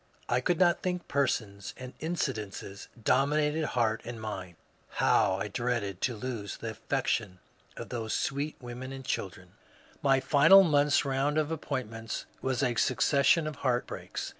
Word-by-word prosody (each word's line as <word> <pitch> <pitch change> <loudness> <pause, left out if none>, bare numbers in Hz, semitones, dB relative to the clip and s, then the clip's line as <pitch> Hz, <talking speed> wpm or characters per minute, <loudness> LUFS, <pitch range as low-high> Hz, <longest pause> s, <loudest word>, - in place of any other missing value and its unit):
I 125 +1 +1
eould 175 +6 +1
not 175 -1 +3
think; 180 -1 -2
persons 105 -8 -1
and 125 0 -8
incidents 110 - -4 0.2
dominated 150 +5 +2
heart 115 -2 +2
and 120 -1 -7
mind; 95 -5 -6 0.4
how 95 - +3
I 95 +2 -3
dreaded 105 -4 -2
to 125 - 0
lose 110 -3 -5
the 115 - -5
affec 130 +5 -2
tion 100 -5 -1 0.4
of - - -7
those 115 -3 -4
sweet 140 +3 -2
women 125 +1 -7
and 135 -1 -8
children 95 -6 -4
I - - -28
My 135 -1 +4
final 160 +8 +7
month's 145 -4 +3
round 140 +2 0
of 155 0 +1
appointments 115 -8 -4 0.2
was 130 0 0
a 125 -2 +2
succession 140 +6 +3
of 155 -2 -4
heartbreaks. 125 -3 -2
130 Hz, 155 wpm, -29 LUFS, 110-145 Hz, 0.4 s, final